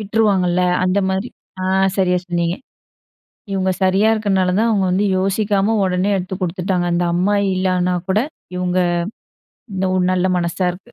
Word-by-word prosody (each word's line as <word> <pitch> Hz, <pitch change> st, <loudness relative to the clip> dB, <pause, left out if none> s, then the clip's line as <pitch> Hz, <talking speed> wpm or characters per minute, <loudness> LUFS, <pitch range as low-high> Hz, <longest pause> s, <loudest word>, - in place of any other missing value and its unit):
விட்டுருவாங்கல்ல. 195 Hz, -4 st, +1 dB, 0.2 s
அந்த 185 Hz, +2 st, +1 dB
மாதிரி. 190 Hz, +5 st, -2 dB, 0.3 s
அ, -, -, -2 dB, 0.3 s
சரியா 180 Hz, -2 st, +2 dB
சொன்னீங்க. 175 Hz, 0 st, -1 dB, 1.0 s
இவங்க 190 Hz, -1 st, 0 dB
சரியா 190 Hz, +3 st, +3 dB
இருக்கிறதுனால 195 Hz, -4 st, +1 dB
தான் 230 Hz, -, +2 dB
அவங்க 200 Hz, -4 st, +1 dB
வந்து 195 Hz, +3 st, +1 dB
யோசிக்காம 200 Hz, +2 st, +1 dB
உடனே 185 Hz, +1 st, 0 dB
எடுத்து 185 Hz, 0 st, -4 dB
கொடுத்துட்டாங்க, 180 Hz, 0 st, -1 dB
அந்த 175 Hz, +1 st, +1 dB
அம்மா 190 Hz, +4 st, +1 dB, 0.2 s
இல்லன்னா 185 Hz, -1 st, 0 dB, 0.2 s
கூட 195 Hz, -, +3 dB, 0.4 s
இவங்க 180 Hz, 0 st, 0 dB, 0.9 s
இந்த 190 Hz, 0 st, -1 dB
ஒ -, -, +1 dB, 0.2 s
நல்ல 185 Hz, 0 st, +1 dB
மனசா 175 Hz, +2 st, -1 dB
இருக்கு. 195 Hz, +7 st, -14 dB
185 Hz, 145 wpm, -19 LUFS, 180-195 Hz, 1.0 s, சரியா